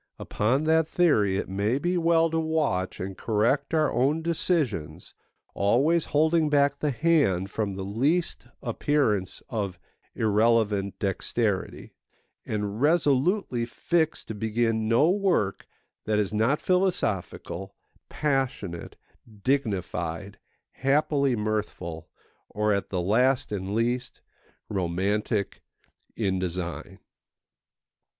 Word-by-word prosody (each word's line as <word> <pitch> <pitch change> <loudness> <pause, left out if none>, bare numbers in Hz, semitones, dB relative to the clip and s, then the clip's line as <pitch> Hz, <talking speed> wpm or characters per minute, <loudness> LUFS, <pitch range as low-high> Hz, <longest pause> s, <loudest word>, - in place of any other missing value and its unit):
Upon 125 +8 0
that 160 0 +3
theory 110 - +2
it - - -3
may 100 +6 0
be 175 +5 -1
well 165 -1 +3
to 165 - +1
watch 155 -13 -1
and 95 +1 -5
correct 120 +8 0
our 155 -2 +2
own 140 +7 +1
decisions, 160 - -1 0.4
always 140 +12 +2
holding 155 +1 +2
back 145 -1 +2
the 150 - 0
hand 130 - +2
from 105 -3 -2
the 95 0 -5
least 135 - 0 0.2
appearance 115 -6 0
of 100 -6 -3 0.4
irrelevant 105 -2 +2
dexterity, 100 +1 -2 0.5
and 105 +1 -3
resolutely 145 - +2
fixed 160 +6 -1
to - - -3
begin 110 +1 0
no 115 +7 +4
work 185 - 0 0.4
that 110 -1 +1
is 105 -1 0
not 115 +7 +2
philosophical, 110 - -1 0.3
passionate, 135 - -2 0.5
dignified, 100 -7 -2 0.3
happily 140 0 +1
mirthful, 105 -7 -3 0.4
or, 105 0 +1
at 100 - -2
the 90 -2 -1
last 125 +8 +2
and 100 0 -3
least, 120 +2 -1 0.5
romantic 100 +2 -1 0.5
in 95 -4 0
design. 90 -1 -4
115 Hz, 105 wpm, -26 LUFS, 100-150 Hz, 0.5 s, no